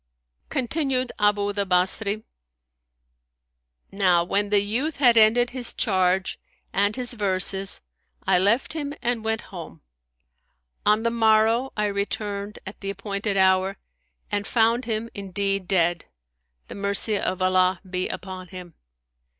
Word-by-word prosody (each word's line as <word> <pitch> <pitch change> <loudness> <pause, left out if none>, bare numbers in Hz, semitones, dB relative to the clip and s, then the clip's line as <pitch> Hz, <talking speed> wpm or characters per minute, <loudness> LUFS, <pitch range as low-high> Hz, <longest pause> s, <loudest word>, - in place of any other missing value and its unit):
Continued 260 -1 -1
Abu 205 -1 +2
the 200 0 0
Basri, 200 +3 +2 1.7
"Now 185 -3 +3
when 200 +3 0
the 205 0 +4
youth 255 +10 -2
had 245 -4 +5
ended 230 +2 +5
his 250 -2 0
charge 185 -3 +1 0.3
and 205 +1 +1
his 250 -1 -3
verses 195 -2 -1 0.4
I 180 - +4
left 215 +11 +2
him 290 -2 -4
and 240 -2 0
went 220 0 -1
home. 165 - -9 1.1
On 210 +1 +3
the 230 - +1
morrow, 225 +2 +3
I 210 - +1
returned, 200 0 -3
at 190 - -9
the 195 - -5
appointed 200 +1 -3
hour, 190 +1 +3 0.5
and 205 -1 -1
found 235 +2 +2
him 225 0 -2
indeed 195 -1 -2
dead, 175 -2 +1 0.6
the - - -9
mercy 200 +1 +1
of 185 - -2
Allah 185 0 +2
be 185 0 -2
upon 185 -1 -7
him! 180 -2 -10
205 Hz, 130 wpm, -24 LUFS, 190-225 Hz, 1.7 s, had